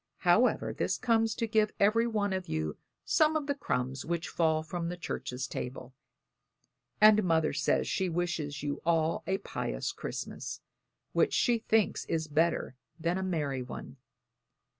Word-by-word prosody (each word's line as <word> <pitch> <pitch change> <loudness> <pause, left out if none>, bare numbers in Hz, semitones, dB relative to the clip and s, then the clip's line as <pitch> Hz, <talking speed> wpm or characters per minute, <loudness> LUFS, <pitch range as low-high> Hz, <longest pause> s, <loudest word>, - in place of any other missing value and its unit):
However, - - +3
this - - -1
comes 225 -2 +2
to 230 - -1
give 215 -1 +2
every 225 +4 +4
one 205 -3 0
of 185 -1 -3
you 80 -1 -2 0.3
some 310 0 +3
of 305 -2 0
the 285 - 0
crumbs 130 - -2
which 170 +1 -2
fall 160 -2 +1
from 170 +1 -3
the 175 - -5
church's 130 -6 -4
table, 125 +1 -6 1.1
and 215 0 +7
Mother 160 -4 +2
says 145 +2 +1
she 190 -2 0
wishes 165 -4 -2
you 145 -1 -3
all 165 -1 +2
a 190 - +1
pious - - -3
Christmas, - - -5 0.5
which - - +3
she 240 -2 +3
thinks 220 -1 +1
is 160 -1 -1
better 160 -2 +1 0.3
than 170 +3 0
a - - -2
merry 150 -8 -1
one. 125 +2 -8
170 Hz, 155 wpm, -30 LUFS, 145-215 Hz, 1.1 s, and